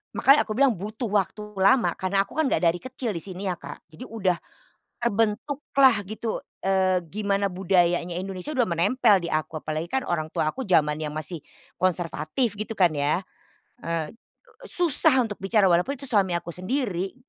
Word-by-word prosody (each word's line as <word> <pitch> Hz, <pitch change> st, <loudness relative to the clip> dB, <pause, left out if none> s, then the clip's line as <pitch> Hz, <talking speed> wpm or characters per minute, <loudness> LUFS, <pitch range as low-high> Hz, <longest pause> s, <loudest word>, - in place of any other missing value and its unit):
makanya 275 Hz, +2 st, +5 dB
aku 215 Hz, -, -2 dB
bilang 275 Hz, 0 st, +4 dB
butuh 215 Hz, +5 st, -5 dB
waktu 205 Hz, +1 st, 0 dB, 0.2 s
lama 235 Hz, +6 st, +4 dB
karena 195 Hz, +1 st, +1 dB
aku -, -, -22 dB
kan 315 Hz, -, +2 dB
enggak 260 Hz, -, 0 dB
dari 170 Hz, +1 st, +3 dB
kecil 255 Hz, -1 st, -4 dB
di 170 Hz, -, -2 dB
sini 190 Hz, -1 st, -7 dB
ya, 180 Hz, -, -1 dB
Kak. -, -, -10 dB
Jadi 155 Hz, -, -10 dB
udah 190 Hz, -6 st, 0 dB, 0.7 s
terbentuklah 235 Hz, +4 st, +2 dB
gitu, 220 Hz, +1 st, -4 dB, 0.2 s
eee, 190 Hz, -1 st, +2 dB
gimana 200 Hz, +1 st, 0 dB
budayanya 175 Hz, -2 st, +1 dB
Indonesia 190 Hz, +8 st, -5 dB
udah 250 Hz, -3 st, +2 dB
menempel 200 Hz, +5 st, +3 dB
di 170 Hz, -, -4 dB
aku. 155 Hz, +1 st, -2 dB
Apalagi 155 Hz, +2 st, -3 dB
kan 265 Hz, +5 st, -1 dB
orang 155 Hz, -2 st, -2 dB
tua 155 Hz, -, +1 dB
aku 265 Hz, -, -5 dB
zamannya 155 Hz, -4 st, +2 dB
masih 155 Hz, +1 st, -5 dB, 0.4 s
konservatif 180 Hz, -, 0 dB
gitu 215 Hz, +2 st, -4 dB
kan 180 Hz, -3 st, +5 dB
ya. 145 Hz, +5 st, +1 dB, 0.6 s
Eee, 165 Hz, -2 st, -2 dB, 0.5 s
susah 325 Hz, -, +2 dB
untuk 215 Hz, -4 st, -5 dB
bicara, 195 Hz, 0 st, +3 dB
walaupun 175 Hz, +11 st, +2 dB
itu 275 Hz, -, -11 dB
suami 195 Hz, -6 st, +2 dB
aku 170 Hz, -, -5 dB
sendiri. 190 Hz, -, -2 dB
195 Hz, 165 wpm, -25 LUFS, 175-230 Hz, 0.7 s, makanya